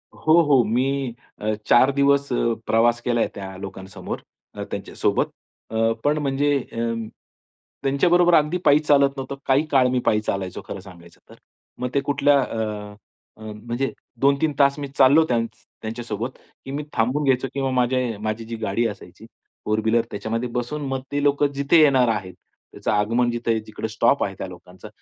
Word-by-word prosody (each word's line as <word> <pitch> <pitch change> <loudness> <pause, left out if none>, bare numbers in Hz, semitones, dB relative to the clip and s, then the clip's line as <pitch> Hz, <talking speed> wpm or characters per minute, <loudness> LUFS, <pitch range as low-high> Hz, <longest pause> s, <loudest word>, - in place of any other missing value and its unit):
हो, 160 +2 +4
हो. 140 -5 +4
मी 130 +2 -1 0.3
अ, 110 0 0
4 130 +3 +5
दिवस 140 0 +2
अ, 120 -1 +1
प्रवास 120 +1 +3
केलाय 120 -1 +1
त्या 95 -1 -7
लोकांसमोर. 95 0 -7 0.4
अ, - - -5
त्यांच्यासोबत. - - -1 0.4
अ, 115 0 +1
पण 150 +1 +2
म्हणजे 145 0 +1
अ, 115 0 -2 0.9
त्यांच्याबरोबर 175 +6 +3
अगदी 155 +3 +2
पायी 145 +1 +6
चालत 145 -2 +4
नव्हतं. 135 +1 -5
काही 135 +3 +3
काळ 130 -2 +5
मी 125 0 +1
पायी 105 -1 +3
चालायचो 95 -3 -3
खरं - - -6
सांगायचं 85 -3 -15
तर. - - -14 0.4
मग 125 - -2
ते 140 - +4
कुठल्या 145 +1 +3
अ, 105 -4 -4 0.5
म्हणजे 115 +5 -4 0.3
2-3 140 +2 +2
तास 140 0 +4
मी 140 - -4
चाललो 140 +4 +6
त्यांच 115 -3 0 0.3
त्यांच्या 115 +2 -5
सोबत, 115 +4 -4 0.3
की 135 - -6
मी 145 +2 -3
थांबून 125 +6 +1
घ्यायचो 135 -1 +2
किंवा 135 -1 -1
माझ्या 125 0 +1 0.2
माझी 110 +1 -3
जी 115 +1 -6
गाडी 110 +2 0
असायची 105 -3 -10 0.4
फोर 110 0 +1
व्हीलर 115 +1 +2
त्याच्यामध्ये 115 +4 -3
बसून 135 +5 -3
मग 135 0 -2
ते 145 0 0
लोकं 145 0 +3
जिथे 140 +4 +4
येणार 135 -4 +5
आहेत, 95 -4 -2 0.4
त्याचं - - -3
आगमन 115 +4 +2
जिथ 120 0 -4 0.2
जिकडे 110 +1 -5
स्टॉप 110 +6 +2
आहे 95 - -3
त्या - - -5
लोकांचा 90 +2 -12
125 Hz, 170 wpm, -23 LUFS, 110-140 Hz, 0.9 s, पायी